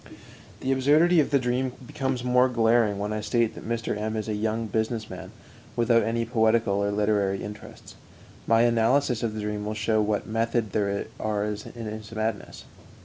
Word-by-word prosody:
'"_ -, -, -25 dB, 0.6 s
The 130 Hz, -, -1 dB
absurdity 150 Hz, +6 st, +4 dB
of 150 Hz, -, +2 dB
the 140 Hz, -, +4 dB
dream 125 Hz, 0 st, -1 dB
becomes 130 Hz, -2 st, -2 dB
the -, -, -3 dB
more 125 Hz, +1 st, +4 dB
glaring 115 Hz, -3 st, +2 dB
when 105 Hz, +1 st, -2 dB
I 110 Hz, -, -2 dB
state 115 Hz, +1 st, +1 dB
that -, -, -10 dB
Mr. 115 Hz, -2 st, -2 dB
M 110 Hz, +1 st, -3 dB
is 110 Hz, -, -3 dB
a 110 Hz, -, -1 dB
young 110 Hz, +2 st, -1 dB
business 110 Hz, +1 st, -2 dB
man -, -, -8 dB, 0.4 s
without 115 Hz, 0 st, +3 dB
any 115 Hz, +1 st, -1 dB
poetical 110 Hz, -3 st, +2 dB
or 100 Hz, -, +1 dB
literary 100 Hz, -1 st, 0 dB
interests. 105 Hz, 0 st, -10 dB, 0.5 s
My 115 Hz, 0 st, +4 dB
analysis 120 Hz, +2 st, +2 dB
of 115 Hz, -3 st, -2 dB
the 110 Hz, -, -3 dB
dream 105 Hz, 0 st, -3 dB
will 105 Hz, +1 st, -3 dB
show 110 Hz, 0 st, +1 dB
what 105 Hz, 0 st, 0 dB
method 115 Hz, -1 st, -1 dB
there 100 Hz, 0 st, 0 dB
is 105 Hz, 0 st, -3 dB
in 115 Hz, -1 st, -8 dB
this 110 Hz, 0 st, -7 dB
madness. 110 Hz, 0 st, -4 dB
110 Hz, 190 wpm, -26 LUFS, 105-120 Hz, 0.6 s, absurdity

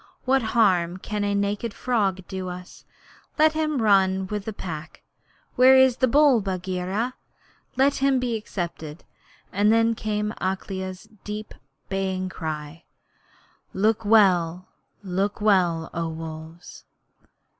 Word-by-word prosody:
What 265 Hz, +1 st, +3 dB, 0.2 s
harm 180 Hz, -5 st, +3 dB
can 210 Hz, +2 st, -4 dB
a 205 Hz, 0 st, 0 dB
naked 205 Hz, +2 st, -2 dB
frog 200 Hz, -7 st, 0 dB
do 190 Hz, -1 st, -5 dB
us? 180 Hz, +1 st, -10 dB, 0.5 s
Let 310 Hz, 0 st, +5 dB
him 305 Hz, -5 st, -1 dB
run 190 Hz, -2 st, +3 dB
with 205 Hz, +1 st, -4 dB
the 220 Hz, -, -3 dB, 0.2 s
Pack. 155 Hz, -1 st, -7 dB, 0.5 s
Where 260 Hz, +1 st, +7 dB
is 260 Hz, -2 st, +5 dB
the 255 Hz, -, +3 dB
bull, 275 Hz, -2 st, +5 dB
Bagheera? 190 Hz, +4 st, -2 dB, 0.6 s
Let 275 Hz, +2 st, +3 dB
him 270 Hz, 0 st, +2 dB
be 250 Hz, -2 st, -1 dB
accepted.' 170 Hz, -7 st, -6 dB, 0.5 s
And 205 Hz, +2 st, +3 dB
then 230 Hz, 0 st, +3 dB
came 210 Hz, -1 st, -2 dB
Akela's 190 Hz, 0 st, -4 dB, 0.2 s
deep 210 Hz, +1 st, -6 dB, 0.3 s
bay, 190 Hz, -1 st, -2 dB
crying: 155 Hz, -2 st, -6 dB, 0.9 s
Look 215 Hz, +3 st, +1 dB
well 185 Hz, -5 st, +3 dB, 0.3 s
look 195 Hz, +2 st, -2 dB
well, 180 Hz, -6 st, +2 dB
O 165 Hz, 0 st, -2 dB
Wolves!' 160 Hz, +1 st, -9 dB
195 Hz, 125 wpm, -24 LUFS, 180-225 Hz, 0.9 s, Where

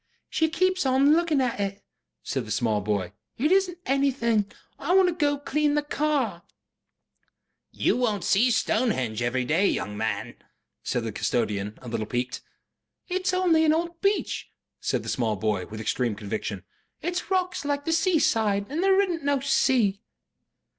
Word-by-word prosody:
"She 320 Hz, 0 st, +2 dB
keeps 370 Hz, +3 st, +1 dB
on 270 Hz, +2 st, +4 dB
looking 325 Hz, -4 st, +2 dB
at 245 Hz, -4 st, -1 dB
it," 200 Hz, 0 st, -3 dB, 0.4 s
said 130 Hz, -5 st, -3 dB
the -, -, -9 dB
small 105 Hz, 0 st, 0 dB
boy. 100 Hz, -2 st, -2 dB, 0.2 s
"It 300 Hz, +7 st, +1 dB
isunt 380 Hz, -2 st, +2 dB
anything. 250 Hz, -6 st, +1 dB, 0.3 s
I 345 Hz, +6 st, +1 dB
want 380 Hz, -1 st, +6 dB
to -, -, -1 dB
go 295 Hz, -3 st, +1 dB
and 285 Hz, 0 st, -14 dB
clean 295 Hz, +1 st, +1 dB
the 295 Hz, -, +1 dB
car." 285 Hz, -, -1 dB, 1.3 s
"You -, -, +1 dB
won't 215 Hz, -7 st, 0 dB
SEE 235 Hz, +6 st, +3 dB
Stonehenge 170 Hz, -, 0 dB
every 125 Hz, +1 st, 0 dB
day, 165 Hz, +9 st, +2 dB
young 105 Hz, -, -2 dB
man," 110 Hz, -1 st, -3 dB, 0.4 s
said 125 Hz, -, -2 dB
the 115 Hz, -, -3 dB
custodian, 105 Hz, -2 st, -1 dB
a -, -, -9 dB
little 110 Hz, -2 st, -3 dB
piqued. 125 Hz, +2 st, -3 dB, 0.7 s
"It's 370 Hz, +1 st, 0 dB
only 360 Hz, -3 st, +3 dB
an 310 Hz, -1 st, +4 dB
old 340 Hz, +1 st, -2 dB
beach," 400 Hz, +1 st, 0 dB, 0.3 s
said -, -, -1 dB
the -, -, -9 dB
small 115 Hz, -5 st, 0 dB
boy, 100 Hz, -2 st, -1 dB
with 110 Hz, 0 st, -8 dB
extreme 115 Hz, 0 st, -1 dB
conviction. 105 Hz, -2 st, -4 dB, 0.4 s
"It's 355 Hz, +3 st, -3 dB
rocks 365 Hz, -5 st, 0 dB
like 285 Hz, 0 st, -2 dB
the 325 Hz, -, +1 dB
seaside. 225 Hz, -, +2 dB
And 315 Hz, +4 st, -1 dB
there 385 Hz, 0 st, +4 dB
isunt 360 Hz, -5 st, 0 dB
no 285 Hz, -1 st, +2 dB
sea." 245 Hz, -7 st, +2 dB
250 Hz, 165 wpm, -26 LUFS, -, 1.3 s, want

